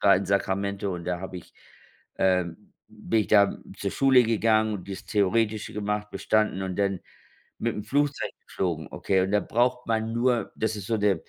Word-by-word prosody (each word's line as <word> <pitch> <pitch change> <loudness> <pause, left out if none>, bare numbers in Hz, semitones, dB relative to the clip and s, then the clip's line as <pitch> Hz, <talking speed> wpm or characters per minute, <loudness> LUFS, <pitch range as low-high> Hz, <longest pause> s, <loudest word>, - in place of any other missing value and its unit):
in 95 +2 -1
Sacramento 100 0 -1
und 85 -1 -6
da 90 -1 -2
habe 95 0 -6
ich, - - -14 0.6
ähm 90 -3 0 0.2
bin 115 - -1
ich - - -5
da 100 -2 +4 0.2
zur 100 - -2
Schule 130 -2 +5
gegangen 110 -1 +2
und 95 0 -9
das 95 - -6
Theoretische 105 +1 0
gemacht 105 0 -2
bestanden 110 -3 0
und 95 -1 -4
dann 100 -2 0 0.6
mit 115 -1 -1
dem 105 - -5
Flugzeug 145 +5 0 0.2
geflogen, 85 -4 -2
okay? 95 - 0
Und 95 +1 -1
da 105 - +3
braucht 125 +3 0
man 110 0 0
nur 120 0 +1
das 110 0 -1
ist 100 -2 -7
so 115 - +1
der, 105 -2 +3
105 Hz, 180 wpm, -26 LUFS, 95-110 Hz, 0.6 s, Schule